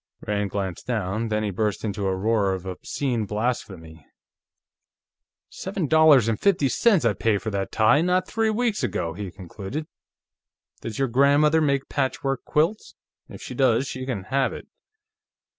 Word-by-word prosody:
Rand 105 -1 -1
glanced 95 -3 -4
down. 110 -1 -1
Then 110 -1 -1
he 105 - -1
burst 105 +2 -2
into 100 -1 -2
a 95 - 0
roar 100 0 +1
of 95 -1 -6
obscene 115 +4 -3
blasphemy. 95 -8 -4 1.4
"Seven 190 -2 -4
dollars 155 -5 +5
and 115 -2 0
fifty 175 -9 +2
cents 195 - +3
I 115 - +3
paid 105 -2 0
for 110 - -3
that 100 -1 -3
tie, 115 +7 +4
not 180 +1 +1
three 225 0 0
weeks 225 0 0
ago," 85 -2 -2
he 100 +2 -6
concluded. 100 - -7 1.0
"Does 110 -2 -6
your 135 - +1
grandmother 145 +5 +4
make 140 -2 +1
patchwork 135 -1 -2
quilts? 165 +8 0 0.3
If - - -10
she - - -7
does, 125 -1 +2
she 130 -2 -6
can 110 -8 -3
have 135 +5 0
it." - - -9
115 Hz, 160 wpm, -24 LUFS, 100-145 Hz, 1.4 s, dollars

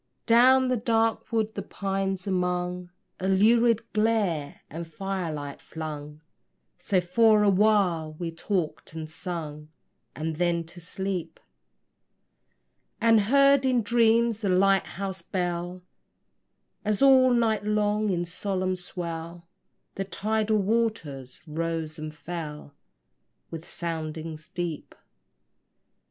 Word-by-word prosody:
Down 255 +3 +6
the 255 - +2
dark 225 0 0
wood, 220 -1 0
the 200 - -4
pines 195 -1 -3
among, 180 -1 -1 0.3
A 190 - -2
lurid 225 +3 +3
glare 210 -10 0
the 165 +3 -5
firelight 165 -4 -4
flung; 150 -1 -7 0.6
So 195 -3 +1
for 210 +4 +4
a 205 - +5
while 185 -6 +2
we 165 +1 -5
talked 165 -1 -3
and 160 -1 -5
sung, 155 -2 -6 0.5
And 155 0 -3
then 170 -1 +1
to 175 +2 -13
sleep; 190 0 -4 1.6
And 225 -1 +5
heard 275 +5 +5
in 255 -3 +2
dreams 230 0 +3
the 200 - 0
light 195 +1 +3
house 190 -2 -5
bell, 175 0 -3 1.0
As 215 +4 +1
all 260 -2 +7
night 230 -3 +2
long 210 0 +1
in 175 -2 0
solemn 185 +1 -2
swell 170 -1 -6 0.5
The 195 - -3
tidal 215 +2 0
waters 195 - -1
rose 160 0 -3
and 155 0 -5
fell 155 -3 -7 0.8
With 165 0 -7
soundings 160 -2 -5
deep. 170 -4 -5
185 Hz, 115 wpm, -27 LUFS, 165-215 Hz, 1.6 s, all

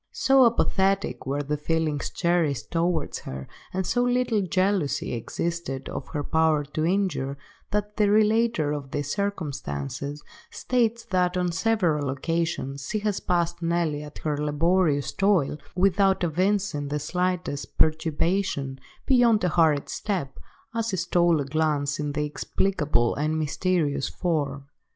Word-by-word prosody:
So 270 -2 +5
apathetic 195 - +1
were 140 +2 -1
the 150 +1 -2
feelings 155 -1 -1
cherished 165 -7 0
towards 165 -2 0
her, 65 0 -7 0.2
and 190 0 -2
so 245 +8 +1
little 245 -3 +2
jealousy 185 -5 0
existed 135 +3 -3
of 130 - -5
her 150 -2 -3
power 160 -1 +2
to 150 +2 -3
injure, 170 -7 0 0.3
that 210 0 -2
the 210 -2 +3
relater 215 -6 +3
of 145 -2 -4
these 145 +1 -2
circumstances 145 - -4 0.3
states 235 -2 0
that 180 -1 +2
on 180 -1 0
several 165 -6 +1
occasions 140 -1 -2
she - - 0
has 210 -2 0
passed 170 -1 0
Nelly 165 -3 0
at 150 0 -10
her 150 -2 0
laborious 150 0 +1
toil, 190 -7 +2 0.2
without 195 +1 +3
evincing 180 -2 0
the 145 +1 -2
slightest 180 -1 -2
perturbation, 160 -2 +1 0.3
beyond 240 -5 +4
a 180 - +3
hurried 155 -3 +3
step, 180 -10 -3 0.3
as 230 -1 -1
she 190 - -1
stole 175 -2 +2
a 140 - -1
glance 145 -1 0
at 145 -1 -3
the 150 - 0
inexplicable 150 -4 0
and 155 +2 -1
mysterious 155 -2 0
form. 145 -6 -2
165 Hz, 135 wpm, -25 LUFS, 145-190 Hz, 0.3 s, So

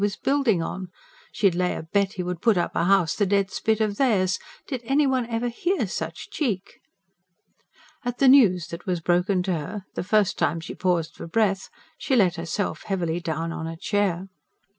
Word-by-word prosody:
was 205 0 +1
building 265 -11 +1
on. 185 +2 -5 0.4
She'd 195 -4 +2
lay 180 +1 0
a - - -5
bet 195 +4 0
he 185 -4 -3
would 180 -1 -4
put 225 -5 +3
up 175 - -1
a - - +1
house 190 -4 +3
the 205 - +1
dead 200 0 +1
spit 220 -1 0
of 210 -2 0
theirs. 195 -9 +2 0.3
Did 260 -5 -4
ever 245 - -7
anyone 250 -5 +1
hear 350 +11 0
such - - -5
cheek? 205 - -3 1.2
At 245 0 -3
the 275 - +4
news 205 - +6
that 170 +3 -8
was 180 -2 0
broken 180 +2 +1
to 185 0 0
her, 180 +5 -5
the - - -3
first 210 0 +2
time 165 - +1
she 160 - -7
paused 175 -4 0
for - - -9
breath, 195 +1 +1 0.3
she 265 - 0
let 185 -7 +3
herself 170 +4 -3
heavily 175 -4 -1
down 165 0 -3
on 160 -1 -4
a 165 0 -6
chair. 195 -1 0
195 Hz, 190 wpm, -25 LUFS, 175-220 Hz, 1.2 s, news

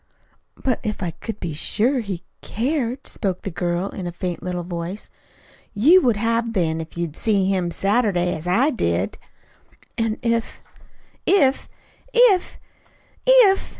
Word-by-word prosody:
"But 255 -3 -1
if 210 -2 -3
I 175 - -2
could 215 +5 -7
be 170 -3 -4
sure 235 - +1
he 195 -6 -5 0.2
cared," 255 +1 -2
spoke 190 -4 -3
the 195 - -4
girl, 175 +3 -1
in 185 -3 -6
a - - -3
faint 175 0 -4
little 180 -1 -3
voice. 175 +3 -6 0.6
"You 315 - +6
would 240 -6 +2
have 230 +1 0
been, 165 -6 0
if 160 +1 -10
you'd 170 -3 -3
seen 205 -4 +1
him 185 -3 0
Saturday, 195 -2 +1
as 160 +2 -6
I 245 +12 +3
did." 90 - -1 0.8
"And 225 0 0
if 230 -1 -1 0.3
" - - -34 0.2
"If 265 0 0 0.5
if 465 -7 +4 0.7
if!" 480 -6 +6
200 Hz, 150 wpm, -22 LUFS, 175-240 Hz, 0.8 s, You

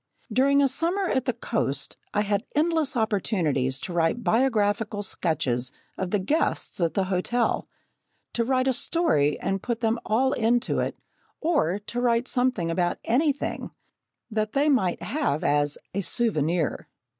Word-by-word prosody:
During 280 +4 +4
a - - +5
summer 335 +9 0
at 260 -9 0
the 250 - +2
coast, 215 - -2 0.2
I 205 - +1
had 205 -1 0
endless 315 -3 +1
opportunities 170 - 0
to 180 - -5
write 170 +8 +1
biographical 215 -3 +1
sketches 130 -10 0 0.2
of 190 - -3
the 205 - +2
guests 205 - -1
at 165 -1 +1
the 195 - +2
hotel 195 +6 0 0.7
to 235 - +1
write 255 +2 +1
a 260 - +3
story 155 - +1
and 195 +1 -1
put 235 +1 -3
them 225 0 +1
all 260 +5 +2
into 235 +1 +1
it, - - -2 0.4
or 300 - +1
to 235 +4 -5
write 240 0 +2
something 245 -10 0
about 175 +1 0
anything, 285 +4 0 0.6
that 215 0 -1
they 285 +2 +3
might 215 -11 +1
have 270 - -1
as 145 0 +2 0.2
"a 200 - -1
souvenir!" 170 - 0
220 Hz, 150 wpm, -26 LUFS, 180-260 Hz, 0.7 s, a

